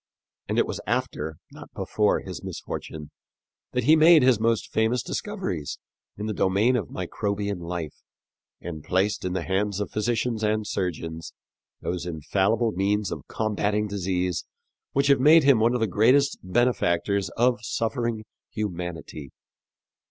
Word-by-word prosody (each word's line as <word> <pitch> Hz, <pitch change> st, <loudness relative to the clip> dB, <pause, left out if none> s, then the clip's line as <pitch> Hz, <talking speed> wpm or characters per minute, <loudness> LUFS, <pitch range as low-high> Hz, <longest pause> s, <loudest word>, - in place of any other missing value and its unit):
And -, -, -1 dB
it -, -, +4 dB
was -, -, -5 dB
after, 105 Hz, -11 st, -2 dB
not -, -, -12 dB
before, -, -, +1 dB
his -, -, -8 dB
misfortune 75 Hz, -2 st, -6 dB, 0.6 s
that -, -, 0 dB
he 155 Hz, +6 st, +6 dB
made 160 Hz, -1 st, +7 dB
his 125 Hz, -4 st, +4 dB
most 115 Hz, -1 st, 0 dB
famous 110 Hz, +3 st, +1 dB
discoveries 185 Hz, -, -4 dB, 0.4 s
in 105 Hz, -, -4 dB
the 110 Hz, -, -2 dB
domain 100 Hz, +6 st, +2 dB
of 110 Hz, -8 st, -2 dB
microbian 100 Hz, +1 st, -3 dB
life, 85 Hz, -3 st, -5 dB, 0.6 s
and 80 Hz, -4 st, -7 dB
placed 95 Hz, +3 st, 0 dB
in 90 Hz, -1 st, -2 dB
the 90 Hz, -2 st, -2 dB
hands 100 Hz, +2 st, -1 dB
of 105 Hz, -, -3 dB
physicians 115 Hz, +1 st, -1 dB
and 105 Hz, 0 st, +1 dB
surgeons 85 Hz, -4 st, -4 dB, 0.5 s
those 90 Hz, 0 st, -3 dB
infallible 100 Hz, +8 st, +1 dB
means 100 Hz, +2 st, 0 dB
of -, -, -6 dB
combatting 105 Hz, -1 st, -1 dB
disease 90 Hz, -3 st, -1 dB, 0.5 s
which 140 Hz, +1 st, +2 dB
have 140 Hz, -1 st, +5 dB
made 155 Hz, +4 st, +7 dB
him 135 Hz, -4 st, +5 dB
one 115 Hz, +3 st, +3 dB
of -, -, 0 dB
the 110 Hz, -, +2 dB
greatest 125 Hz, +8 st, +3 dB
benefactors 100 Hz, -3 st, +1 dB
of 125 Hz, +1 st, +3 dB
suffering 115 Hz, -1 st, -2 dB, 0.2 s
humanity. 90 Hz, -, -5 dB
105 Hz, 145 wpm, -25 LUFS, 90-120 Hz, 0.6 s, made